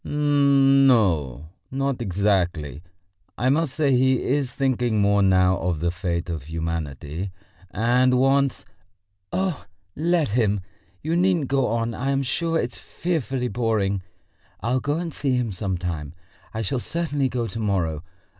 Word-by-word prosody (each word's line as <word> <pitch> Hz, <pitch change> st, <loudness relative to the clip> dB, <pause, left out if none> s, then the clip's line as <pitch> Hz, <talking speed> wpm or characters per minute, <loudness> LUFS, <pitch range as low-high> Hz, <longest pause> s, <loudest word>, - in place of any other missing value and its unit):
"N 140 Hz, -2 st, +4 dB
no, 80 Hz, -, +2 dB, 0.2 s
not 135 Hz, -1 st, -2 dB
exactly.... 90 Hz, -7 st, 0 dB, 0.6 s
I 125 Hz, +3 st, +1 dB
must 150 Hz, -2 st, 0 dB
say 150 Hz, -3 st, +2 dB
he 130 Hz, 0 st, +3 dB
is 135 Hz, -1 st, 0 dB
thinking 125 Hz, -4 st, 0 dB
more 100 Hz, 0 st, +3 dB
now 95 Hz, -1 st, +4 dB
of 85 Hz, -3 st, -1 dB
the 85 Hz, +2 st, 0 dB
fate 85 Hz, -1 st, -3 dB
of 80 Hz, -6 st, -5 dB
humanity, 80 Hz, +1 st, -4 dB, 0.4 s
and 125 Hz, +5 st, +2 dB
wants...." 135 Hz, +1 st, +2 dB, 0.7 s
"Oh, 185 Hz, -5 st, -1 dB, 0.3 s
let 165 Hz, -2 st, +1 dB
him! 105 Hz, -3 st, +1 dB, 0.4 s
You 160 Hz, +2 st, 0 dB
needn't 175 Hz, -5 st, +2 dB
go 135 Hz, -1 st, +2 dB
on! 115 Hz, +1 st, -1 dB
I 135 Hz, +4 st, -2 dB
am 140 Hz, 0 st, +1 dB
sure 165 Hz, +5 st, 0 dB
it's 120 Hz, -, -3 dB
fearfully 135 Hz, -7 st, -2 dB
boring. 105 Hz, -4 st, 0 dB, 0.6 s
I'll 125 Hz, +3 st, 0 dB
go 145 Hz, +4 st, -1 dB
and 170 Hz, -2 st, -4 dB
see 135 Hz, -3 st, 0 dB
him 120 Hz, -3 st, -1 dB
some 95 Hz, -1 st, -2 dB
time. 80 Hz, -4 st, -5 dB, 0.4 s
I 110 Hz, 0 st, -3 dB
shall 125 Hz, +6 st, -1 dB
certainly 145 Hz, -3 st, -1 dB
go 120 Hz, -2 st, -2 dB
to 115 Hz, 0 st, -6 dB
morrow. 90 Hz, -7 st, -1 dB
120 Hz, 145 wpm, -24 LUFS, 95-135 Hz, 0.7 s, N